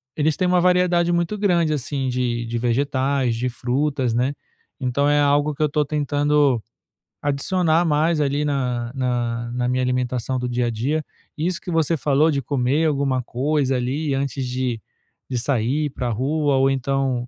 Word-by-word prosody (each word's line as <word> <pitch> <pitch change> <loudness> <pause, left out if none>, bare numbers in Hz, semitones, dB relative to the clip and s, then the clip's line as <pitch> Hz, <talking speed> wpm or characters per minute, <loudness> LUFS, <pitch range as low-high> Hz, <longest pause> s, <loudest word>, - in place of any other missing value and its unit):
eles 155 0 +1
têm 185 - 0
uma 180 -1 +3
variedade 180 -1 +3
muito 175 +4 0
grande, 175 -6 +2
assim 140 -2 -2
de 120 -2 -1
de 120 - -2
vegetais, 130 +1 0
de 125 +2 -1
frutas, 130 +1 -1
né. 125 +4 +1 0.5
Então 130 +2 0
é 145 0 +3
algo 145 +1 +2
que 145 - -8
eu 150 - +3
tô 150 0 +1
tentando 145 -3 +2 0.6
adicionar 160 +4 +1
mais 155 +1 +2
ali 145 +1 0
na 125 -4 -1
na 120 -3 -2
na 125 0 -1
minha 125 +1 0
alimentação 125 0 -1
do 125 0 -2
dia 120 0 0
a - - 0
dia. 135 +8 -1 0.3
Isso 170 +3 -1
que 180 - -6
você 165 0 +1
falou 145 +3 +3
de 145 -3 0
comer 140 +4 0
alguma 135 -4 0
coisa 135 +2 0
ali 140 +4 -1
antes 135 -1 -2
de 125 -2 -2 0.5
de 125 -2 -1
sair 135 +4 0
pra 125 -3 -3
rua 140 +4 0
ou 135 0 +4
então 135 -2 -1
140 Hz, 170 wpm, -22 LUFS, 125-150 Hz, 0.6 s, ou